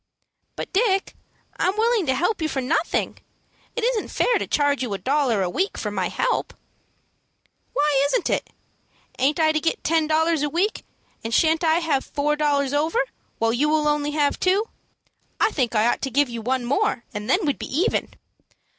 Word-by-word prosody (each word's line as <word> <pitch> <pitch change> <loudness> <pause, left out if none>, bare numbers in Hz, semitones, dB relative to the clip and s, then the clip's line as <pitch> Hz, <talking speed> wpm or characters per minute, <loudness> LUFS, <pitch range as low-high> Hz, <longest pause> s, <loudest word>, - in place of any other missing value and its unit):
"But, - - -6
Dick, 390 -2 +1 0.4
I'm 380 +3 0
willing 450 -5 +2
to 260 - +2
help 355 +8 0
you 315 - 0
for 270 - -2
nothing. 315 +6 -1 0.6
It 475 - -2
isn't 475 -3 0
fair - - +1
to - - -3
charge 285 -1 +1
you 245 -4 -2
a - - -3
dollar 260 -5 +1
a - - 0
week 375 - -1
for - - -3
my - - -1
help." - - -1 1.2
"Why 290 -1 +2
isn't 455 - 0
it? - - -1 0.7
Aint 285 +5 +2
I 315 -1 +4
to 310 - +1
get 325 +1 -1
ten 320 0 +2
dollars 320 0 +2
a 295 - 0
week, 365 +8 -1 0.4
and 225 - -4
shan't 320 +6 +3
I 320 -1 +4
have 315 -6 0
four 295 +1 -1
dollars 285 -2 +1
over, 325 +12 +1 0.3
while 225 0 +1
you 290 +5 +1
will 305 -1 +2
only 295 0 +1
have 295 -1 0
two? 395 +5 +1 0.7
I - - +3
think 250 - -1
I 215 +1 +3
ought 240 - +1
to 270 - -2
give 280 +1 +2
you 235 -1 -5
one 250 +2 -1
more, 285 - 0
and 210 +2 -5
then 365 +6 +2
we'd 285 - -1
be - - -5
even." 340 - 0
300 Hz, 190 wpm, -23 LUFS, 270-345 Hz, 1.2 s, I